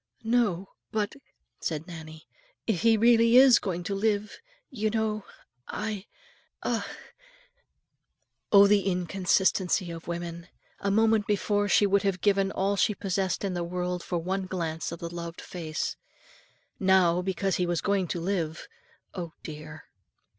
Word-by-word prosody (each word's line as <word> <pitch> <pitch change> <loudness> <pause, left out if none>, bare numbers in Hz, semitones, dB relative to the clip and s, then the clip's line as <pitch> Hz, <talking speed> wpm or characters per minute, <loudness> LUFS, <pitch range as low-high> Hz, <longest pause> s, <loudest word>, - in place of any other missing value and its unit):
"No, 220 -6 +1 0.2
but," 210 -2 -1 0.5
said 155 -1 -3
Nannie, 160 -3 -10 0.4
"if 210 -7 0
he 225 -1 +5
really 230 +1 +5
is 260 -3 +8
going 180 -3 -3
to 200 - -3
live, 210 +1 -1 0.3
you 215 -4 -1
know, 215 -1 -1 0.4
I 210 -2 -4 0.6
a - - 0 0.8
" - - -52
Oh 200 -1 +9
the 200 0 +4
inconsistency 185 0 +1
of 165 0 -9
women! 170 0 -5 0.3
A 200 - -1
moment 220 +1 +3
before, 205 0 +1
and 205 - -2
she 205 - +5
would 200 0 +3
have 195 -3 0
given 195 -1 +2
all 195 +1 0
she 210 +2 +2
possessed 190 -1 -1
in 195 -2 -1
the 175 -1 -2
world 180 +1 -3
for 175 - -3
one 185 +3 -2
glance 165 -4 -3
of 170 - -5
the 170 +1 -7
loved 170 0 -6
face; 160 -4 -4 0.8
now, 185 -2 +4
because 190 0 -1
he 180 - 0
was 175 -1 0
going 200 -3 0
to 175 - -3
live, 170 -3 -2 0.5
oh, 170 -3 -6
dear! 155 0 -9
190 Hz, 150 wpm, -28 LUFS, 170-205 Hz, 0.8 s, Oh